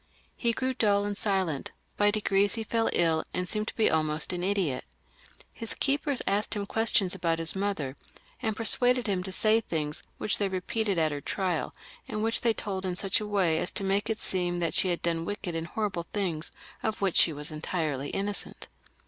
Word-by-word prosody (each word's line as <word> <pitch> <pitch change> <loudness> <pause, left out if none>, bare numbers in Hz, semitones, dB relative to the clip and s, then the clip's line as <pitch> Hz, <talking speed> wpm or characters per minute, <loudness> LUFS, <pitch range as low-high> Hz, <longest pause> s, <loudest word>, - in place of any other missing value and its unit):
He 235 - +1
grew 260 +3 -1
dull 205 -5 +2
and 205 0 -2
silent; 190 -8 -1 0.2
by 205 0 +4
degrees 205 -1 +2
he 225 - -3
feU 225 +1 +1
iU 165 -2 +2
and 180 0 -1
seemed 215 +1 -2
to - - -5
become 220 -7 +3
almost 155 +2 -1
an 175 0 -3
idiot. 185 -9 0 0.7
His 230 - -3
keepers 280 -1 0
asked 205 +3 0
him 205 -1 -2
questions 210 -3 +2
about 165 -1 0
his 165 +1 +1
mother, 190 -9 -2 0.5
and 220 -4 -1
persuaded 245 +2 +5
him 195 -4 0
to 190 +1 -4
say 215 +4 +3
things 150 -6 -2 0.2
which 215 - 0
they 200 -2 +1
repeated 195 +2 -1
at 160 -2 +2
her 145 -1 -4
trial, 185 -2 -1 0.4
and 215 0 -2
which 225 0 +2
they 235 - +3
told 190 -2 -3
iq 180 -1 -2
such 195 -1 +1
a 210 - -4
way 185 -6 +2
as - - -1
to - - -1
make 195 +2 +1
it 220 - 0
seem 180 -3 +1
that 170 -2 -1
she - - +3
had 175 - -1
done 165 -1 0
wicked 190 -1 -4
and 165 0 -3
horrible 190 -3 -3
things 175 -6 -2 0.3
of 220 -2 -2
which 195 -3 +1
she 165 - +6
was 150 +1 -6
entirely 155 -3 -2
innocent. 200 +1 -3
195 Hz, 200 wpm, -28 LUFS, 165-215 Hz, 0.7 s, she